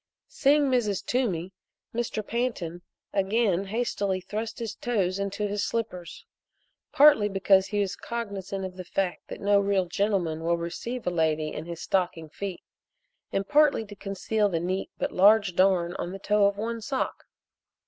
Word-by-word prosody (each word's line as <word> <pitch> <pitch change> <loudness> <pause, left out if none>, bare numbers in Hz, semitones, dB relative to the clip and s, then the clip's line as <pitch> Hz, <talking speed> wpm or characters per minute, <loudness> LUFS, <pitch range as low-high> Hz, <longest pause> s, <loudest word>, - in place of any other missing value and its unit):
Seeing 290 +1 +3
Mrs. 240 -8 +1
Toomey, 195 -8 -1 0.4
Mr. 230 -2 -2
Pantin 210 -9 -2 0.3
again 195 -1 +1
hastily 200 -3 -1
thrust 215 +5 -5
his 230 -3 -4
toes 200 -6 -1
into 200 +1 -2
his 205 0 -2
slippers 185 -7 -4 0.7
partly 285 -8 +6
because 195 -1 +3
he 205 -1 0
was 200 -1 -1
cognizant 200 -5 -4
of 185 0 -8
the 185 - -5
fact 180 0 -2
that - - -7
no 200 0 +4
real 200 -2 +1
gentleman 175 -4 -1
will 170 +1 +2
receive 230 +9 -5
a 180 - +1
lady 160 -2 0
in 160 - -6
his 170 -1 -6
stocking 175 -4 -1
feet, 190 +2 -6 0.7
and 195 0 -1
partly 295 -6 +4
to 205 0 -11
conceal 205 +1 -1
the 170 -3 -1
neat 185 +3 -2
but - - -2
large 200 0 +5
darn 180 -2 +3
on 175 - -4
the 195 - -6
toe 205 +1 +2
of 200 0 -1
one 230 +2 -3
sock. 265 +4 -3
200 Hz, 160 wpm, -27 LUFS, 180-220 Hz, 0.7 s, partly